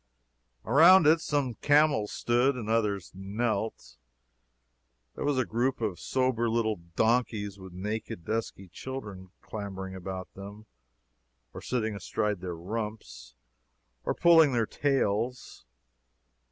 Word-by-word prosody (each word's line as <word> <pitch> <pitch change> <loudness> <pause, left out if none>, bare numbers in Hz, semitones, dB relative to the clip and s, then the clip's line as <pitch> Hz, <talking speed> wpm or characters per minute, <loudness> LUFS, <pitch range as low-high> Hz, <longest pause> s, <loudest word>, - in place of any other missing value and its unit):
Around 165 +8 +7
it 160 +2 +5
some 140 -6 -1
camels 145 -7 +3
stood, 125 +3 +1
and 115 -4 -5
others 105 -4 0
knelt. 100 - -3 1.2
There - - -5
was 145 -2 +1
a 130 - +2
group 120 +5 -1
of 105 -6 -2
sober 130 -3 0
little 110 -1 0 0.2
donkeys 110 -4 +1
with 95 -1 -11
naked, 100 -2 -5
dusky 110 -3 -3
children 100 -2 -8
clambering 95 -3 -6
about 95 0 -7
them, 100 +2 -10 0.9
or - - -8
sitting 110 -4 -2
astride 105 +1 -2
their 90 -2 -4
rumps, 85 - -6 0.7
or - - -1
pulling 165 -5 +6
their 115 -2 +2
tails. 125 - -1
110 Hz, 115 wpm, -29 LUFS, 95-125 Hz, 1.2 s, Around